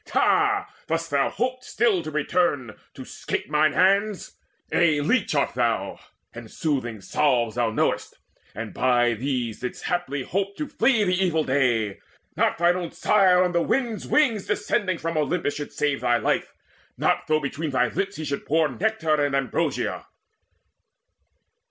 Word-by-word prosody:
Ha, 410 0 +2 0.2
dost 165 0 -2
thou 140 -1 +2
hope 255 +1 -3
still 225 -7 +1
to 155 - -6
return, 150 -6 0 0.2
to - - -9
'scape - - -5
Mine 155 0 +3
hands? 200 +2 +1 0.4
A 160 -4 +3
leech 230 - +1
art - - +1
thou, - - -1 0.3
and - - -10
soothing 130 - -2
salves 120 0 +1
Thou 120 -1 0
knowest, 110 - -1 0.4
and 110 +1 -6
by 120 -2 +2
these 120 -1 -3
didst 125 - -6
haply 175 -6 -2
hope 195 +6 -3
To 300 - -3
flee 235 -3 +2
the 185 -2 +1
evil 160 -4 +1
day! 120 -7 0 0.4
Not - - +1
thine 175 +1 +3
own 175 -2 -4
sire, 185 -2 +3
On 180 - 0
the 170 -1 +1
wind's 235 +1 -1
wings 235 -10 +2
descending 185 -6 0
from 165 0 -3
Olympus, 150 0 0
Should 145 0 -6
save 145 -3 -1
thy 120 -1 +2
life, - - -1 0.5
not - - 0
though 155 0 +2
between 150 +2 -4
thy 135 - +1
lips 195 0 -3
He 155 - -5
should 140 -1 -4
pour 160 0 +2
nectar 160 - 0
and 140 -1 0
ambrosia!" 135 -4 -1
155 Hz, 160 wpm, -24 LUFS, 135-190 Hz, 0.5 s, Mine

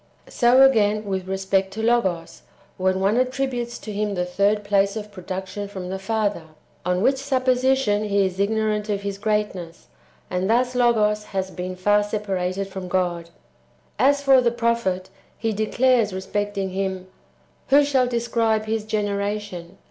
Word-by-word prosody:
So, 250 +2 +5
again, 215 -5 +3
with 190 -2 -3
respect 190 0 0
to 220 +2 -4
Logos, 190 -8 0 0.4
when 185 0 +1
one 200 +4 +2
attributes 255 -2 -1
to 215 - -8
him 205 0 -1
the 180 -1 -1
third 200 +4 +2
^ - - -15
place 200 0 +2
of 210 -1 -6
production 190 +1 -6
from 190 -3 -7
the 190 +1 -4
Father; 205 -3 -1 0.4
on 180 +2 0
which 265 +2 +3
supposition 260 -5 +1
he 200 -1 +2
is 190 0 -4
ignorant 215 +1 0
of 200 -1 -1
His 200 -1 -4
greatness; 205 -6 -3 0.4
and 185 +2 -2
thus 245 +2 +2
Logos 215 -4 +2
has 190 -2 -3
been 185 0 -5
far 205 +3 +3
separated 195 -2 -2
from 190 -1 -7
God. 175 -2 -1 0.7
As 280 +1 +3
for 270 -2 +6
the 240 - +3
prophet, 230 -6 -1 0.3
he 225 -1 -1
declares 225 0 +2
respecting 195 0 -3
Him, 190 -1 -3 0.3
" - - -37
Who 285 +2 +6
shall 270 -3 +2
describe 230 -2 0
His 220 -1 -2
genera 205 -1 -1
tion?" 180 -3 -10
205 Hz, 160 wpm, -23 LUFS, 190-235 Hz, 0.7 s, for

